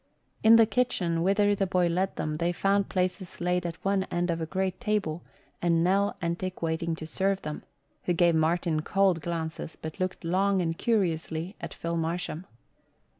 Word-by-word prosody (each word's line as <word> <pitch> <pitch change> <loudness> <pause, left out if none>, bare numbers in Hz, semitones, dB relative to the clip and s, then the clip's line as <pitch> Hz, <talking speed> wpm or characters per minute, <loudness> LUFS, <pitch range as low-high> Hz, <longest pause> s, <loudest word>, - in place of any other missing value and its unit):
In 220 +1 +8
the 230 -1 +7
kitchen, 210 -9 0
whither 205 +3 +3
the 195 -1 0
boy 180 -1 +2
led 180 +3 0
them, 155 0 -2
they 170 +2 +1
found 195 +2 +1
places 185 0 -2
laid 180 0 0
at 165 - -5
one 195 -1 +2
end 175 -1 -1
of 165 0 -2
a 160 - -2
great 190 +1 -2
table 210 -8 -1 0.4
and 170 -1 +3
Nell 195 +3 +2
Entick 175 +2 -2
waiting 165 0 -1
to 160 - -7
serve 195 +4 -1
them, 150 0 -5 0.4
who 175 - +2
gave 170 0 +4
Martin 160 0 +1
cold 190 -1 +2
glances 160 -1 -4
but 160 +3 -7
looked 185 0 -2
long 190 +3 +2
and 165 -2 0
curiously 170 -4 -1
at - - -6
Phil 170 0 -3
Marsham. 165 +1 -3
175 Hz, 175 wpm, -28 LUFS, 165-195 Hz, 0.4 s, In